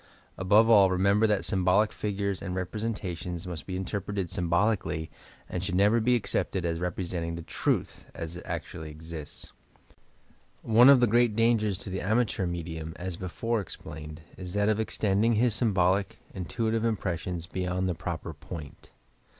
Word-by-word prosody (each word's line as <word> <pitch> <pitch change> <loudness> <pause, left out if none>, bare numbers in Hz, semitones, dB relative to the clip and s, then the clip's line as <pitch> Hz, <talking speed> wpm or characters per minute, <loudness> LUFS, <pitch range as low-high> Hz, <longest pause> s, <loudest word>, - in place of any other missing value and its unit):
Above 105 +4 +4
all, 100 -4 +7
remember 100 +4 +3
that 105 -2 +1
symbolic 95 +3 +3
figures 100 -2 -2
and 90 -2 -4
represen 105 +4 -2
tations 90 -2 -5
must 85 -3 -6
be 95 - -3
interpreted 95 -1 -3
symbolically 85 -3 0 0.4
and - - -4
should 90 - -2
never 105 +5 +4
be 125 +2 +3
accepted 100 -5 -1
as 85 -1 -1
representing 85 -1 -3
the 85 - -6
"truth," - - -1
as 85 +1 -5
it 90 - -8
actually 80 -1 -5
exists. 80 0 -8 1.1
One 120 +4 +7
of 135 -3 +8
the - - +7
great 120 -1 +3
dangers 110 -3 +2
to 95 - -8
the 95 - -3
ama 110 +6 +2
teur 95 -4 -2
medium, 80 -2 -5
as 90 0 -5
before 105 +6 -2
explained, 80 -3 -9 0.2
is 90 0 -6
that 105 +1 +2
of 110 0 +1
extending 110 +1 +1
bis 120 +1 +3
symbolic, 100 -3 +2 0.2
intuitive 110 +4 -1
impressions 90 -6 -2
beyond 90 +1 -2
the 90 - 0
proper 85 0 -5
point. 75 -1 -9
95 Hz, 160 wpm, -28 LUFS, 85-110 Hz, 1.1 s, of